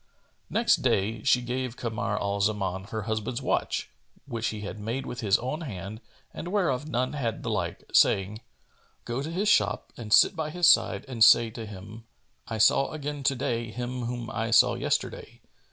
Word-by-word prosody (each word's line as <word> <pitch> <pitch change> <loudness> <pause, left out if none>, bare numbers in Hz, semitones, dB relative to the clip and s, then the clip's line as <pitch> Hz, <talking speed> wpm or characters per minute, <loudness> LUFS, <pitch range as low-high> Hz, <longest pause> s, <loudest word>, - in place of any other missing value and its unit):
Next - - +3
day, 105 +3 0
she 125 0 +3
gave 125 0 -3
Kamar 110 -3 -2
al 100 0 -2
Zaman 95 -2 -1
her 110 +1 -5
husband's 110 +3 -3
watch, - - -1 0.3
which 115 -5 -3
he 105 -1 -4
had 105 +1 -6
made 115 +6 -3
with 120 - -6
his 105 -1 +3
own 130 +7 -4
hand 105 - -7 0.3
and - - -7
whereof 160 -8 0
none 130 -2 -1
had 120 -7 -3
the - - -2
like, - - -3
saying, 100 +3 +3 0.6
"Go 120 +3 -3
to 150 - -4
his 190 +5 -1
shop 105 - +2
and 110 -3 -8
sit 185 - +6
by 160 -2 -3
his 175 +1 +2
side - - +4
and 120 -4 +2
say 115 0 +6
to 110 -1 -7
him, 105 +3 -10 0.4
'I 110 - -4
saw 110 +5 +4
again 145 -1 -5
to 135 0 +1
day 120 -2 -2
him 125 +1 -4
whom 120 -1 -5
I 115 0 -2
saw 115 - +5
yesterday. - - -3
115 Hz, 185 wpm, -27 LUFS, 105-130 Hz, 0.6 s, sit